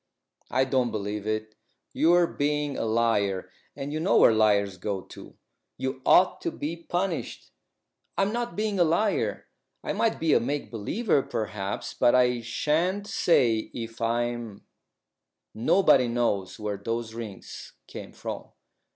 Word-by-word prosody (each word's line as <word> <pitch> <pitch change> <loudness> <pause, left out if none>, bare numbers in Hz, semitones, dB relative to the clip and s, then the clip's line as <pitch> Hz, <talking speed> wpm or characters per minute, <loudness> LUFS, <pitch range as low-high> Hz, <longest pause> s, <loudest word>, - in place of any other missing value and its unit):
"I 130 +2 +2
don't 130 -2 +1
believe 105 -1 -4
it. 110 0 -2 0.4
You're 175 +2 +4
being 150 -2 -1
a - - -2
liar, 110 -4 +1 0.2
and 140 +2 -5
you 155 - -2
know 180 +5 +3
where - - +7
liars 100 -3 +2
go 95 +1 -3
to. - - -13 0.4
You 130 0 -3
ought 185 +1 +5
to - - -1
be 160 0 -4
punished." 175 0 -3 0.7
"I'm 195 +2 +1
not 240 0 -3
being 210 -2 -1
a - - +7
liar. 185 +6 0 0.4
I - - -2
might 225 - 0
be 160 -2 +2
a - - +5
make 140 +4 -3
believer, 140 - 0
perhaps, 105 -5 -4
but 120 - +3
I 125 -1 +3
shan't 155 - 0
say 125 - +2
if 115 -1 -6
I 115 +1 +1
am. 120 -4 -6 0.9
Nobody 130 - +4
knows 115 -6 -1
where 105 -2 -3
those 115 +2 -4
rings 110 -4 -8
came - - -9
from. - - -6
120 Hz, 145 wpm, -27 LUFS, 110-160 Hz, 0.9 s, where